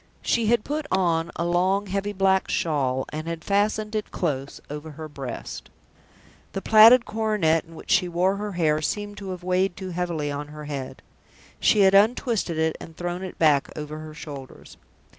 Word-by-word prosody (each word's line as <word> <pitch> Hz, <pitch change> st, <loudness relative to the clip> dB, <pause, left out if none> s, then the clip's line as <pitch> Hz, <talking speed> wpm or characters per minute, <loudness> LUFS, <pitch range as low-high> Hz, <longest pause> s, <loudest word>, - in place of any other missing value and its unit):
She 230 Hz, -2 st, +1 dB
had 235 Hz, -1 st, +3 dB
put 295 Hz, 0 st, -3 dB
on 170 Hz, -3 st, +1 dB
a 170 Hz, -, -2 dB
long, 185 Hz, +4 st, +1 dB
heavy 200 Hz, +1 st, -2 dB
black 190 Hz, -1 st, +2 dB
shawl, 130 Hz, -5 st, 0 dB
and 155 Hz, +2 st, -6 dB
had 165 Hz, -1 st, -4 dB
fastened 210 Hz, +1 st, 0 dB
it 215 Hz, -1 st, -2 dB
close 140 Hz, -5 st, -3 dB
over 150 Hz, +1 st, -7 dB
her 155 Hz, +2 st, -7 dB
breast. 135 Hz, -5 st, -7 dB, 0.8 s
The 195 Hz, -, -3 dB
plaited 225 Hz, +3 st, +8 dB
coronet 210 Hz, -8 st, +1 dB
in 165 Hz, 0 st, -15 dB
which -, -, -7 dB
she 180 Hz, -, +4 dB
wore 185 Hz, +3 st, +1 dB
her 205 Hz, 0 st, -4 dB
hair 155 Hz, -3 st, +1 dB
seemed 205 Hz, +5 st, -3 dB
to 195 Hz, -1 st, -7 dB
have 180 Hz, -1 st, -6 dB
weighed 185 Hz, 0 st, +1 dB
too 190 Hz, -1 st, -6 dB
heavily 170 Hz, -4 st, -2 dB
on 145 Hz, +1 st, -4 dB
her 150 Hz, 0 st, -9 dB
head. 140 Hz, -3 st, -6 dB, 0.6 s
She 210 Hz, -, +4 dB
had 190 Hz, 0 st, +6 dB
untwisted 210 Hz, -, +2 dB
it, 160 Hz, 0 st, +1 dB
and 165 Hz, -, -11 dB
thrown 175 Hz, +1 st, -3 dB
it 190 Hz, -1 st, -7 dB
back 150 Hz, -4 st, +3 dB
over 150 Hz, 0 st, -6 dB
her 155 Hz, 0 st, -9 dB
shoulders. 140 Hz, -4 st, -10 dB
175 Hz, 180 wpm, -25 LUFS, 155-200 Hz, 0.8 s, plaited